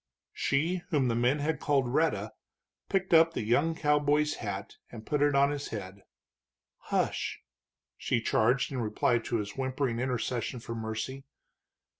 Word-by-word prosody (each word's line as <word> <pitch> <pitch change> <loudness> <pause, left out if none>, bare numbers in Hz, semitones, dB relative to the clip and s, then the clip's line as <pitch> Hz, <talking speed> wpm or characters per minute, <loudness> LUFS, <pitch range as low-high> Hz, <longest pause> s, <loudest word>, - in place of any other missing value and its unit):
She 160 +6 +1
whom 140 -7 +2
the 115 - +1
man 125 +4 +2
had 150 +1 -1
called 135 -5 +1
Rhetta 110 -10 +1 0.6
picked 190 -2 0
up 165 0 +6
the - - -1
young 145 +9 +2
cowboy's 150 0 +2
hat 100 -3 -5
and 110 -2 -9
put 150 -1 0
it 145 -1 +3
on 140 +1 +4
his 145 -1 -4
head. 100 -2 -7 0.8
"Hush!" - - -1 0.6
she 120 - 0
charged, 120 +3 +2
in 135 - -3
reply 115 +2 +1
to 115 - -4
his 105 -2 -3
whimpering 130 -2 -1
intercession 125 -1 -2
for 115 0 -6
mercy. 115 +4 -4
130 Hz, 150 wpm, -30 LUFS, 115-145 Hz, 0.8 s, up